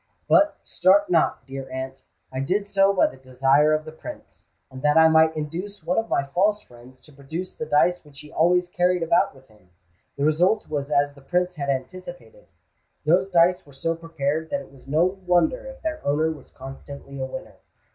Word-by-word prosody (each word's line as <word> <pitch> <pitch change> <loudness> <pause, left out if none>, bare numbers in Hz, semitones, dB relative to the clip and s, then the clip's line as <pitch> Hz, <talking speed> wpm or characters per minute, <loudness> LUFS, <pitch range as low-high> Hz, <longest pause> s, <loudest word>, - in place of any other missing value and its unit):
But, 305 +1 +4
start 195 +1 +3
not, 165 -2 +2
dear 135 0 -7
aunt—I 130 0 -8
did 195 +9 -1
so 195 -1 +3
by 195 - +3
the 130 - -4
desire 135 +3 +2
of 155 0 0
the 155 - -8
Prince, 160 - -11 0.2
and 130 0 -9
that 150 +2 +3
I 160 0 +8
might 160 0 +4
induce 170 +6 -5
one 180 +6 +1
of 225 - -4
my - - +1
false 195 +9 +1
friends 125 +2 -17
to 150 - -18
produce 160 +7 -6
the 155 - -6
dice 175 +4 +2
which 145 -2 -14
he 150 0 -14
always 180 +2 +2
carried 180 0 +1
about 170 -2 +2
with 130 0 -19
him. 105 -4 -24 0.5
The 140 - 0
result 180 +8 +2
was 145 -2 -3
as 145 -1 +2
the 140 - -17
Prince 180 +4 -1
had 140 -1 -3
anticipated: 175 - -6 0.6
those 180 +5 +3
dice 180 0 +3
were 140 - -18
so 165 +5 -1
prepared 160 -1 -3
that 280 - -2
it - - -14
was 135 -1 -18
no 155 +5 +3
wonder 185 - 0
if - - -11
their 315 -1 -3
owner 155 +3 +1
was 150 -4 -11
constantly 140 +1 -10
a 130 - -2
winner. - - -9
160 Hz, 195 wpm, -24 LUFS, 140-180 Hz, 0.6 s, I